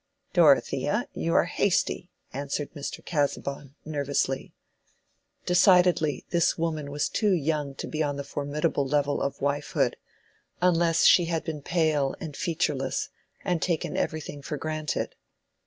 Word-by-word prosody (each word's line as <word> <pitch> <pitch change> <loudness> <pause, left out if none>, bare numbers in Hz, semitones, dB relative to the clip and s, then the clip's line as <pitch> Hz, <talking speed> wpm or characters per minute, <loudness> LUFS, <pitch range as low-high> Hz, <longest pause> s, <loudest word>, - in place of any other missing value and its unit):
"Dorothea, - - +3
you 85 +1 -1
are - - +6
hasty," - - 0 0.2
answered 140 +1 -3
Mr. 145 -3 -6
Casaubon, 140 -2 -2
nervously. 140 -3 -1 0.9
Decidedly, 180 -4 +4
this 170 -1 +2
woman 155 -3 -2
was 145 +1 -1
too 210 -3 +1
young 150 -4 -1
to - - -5
be 155 - -3
on 145 -2 0
the 140 - -4
formidable 145 0 -1
level 145 0 +1
of 140 0 -2
wifehood—unless 165 +4 -1
she 175 - +7
had 165 -1 -1
been 155 -2 -5
pale 155 -4 +1
and 160 -6 -6
featureless 150 -7 -1 0.4
and 180 -4 0
taken 170 -3 -1
everything 155 -2 -3
for 150 +2 -4
granted. 155 +1 -3
150 Hz, 125 wpm, -27 LUFS, 140-165 Hz, 0.9 s, she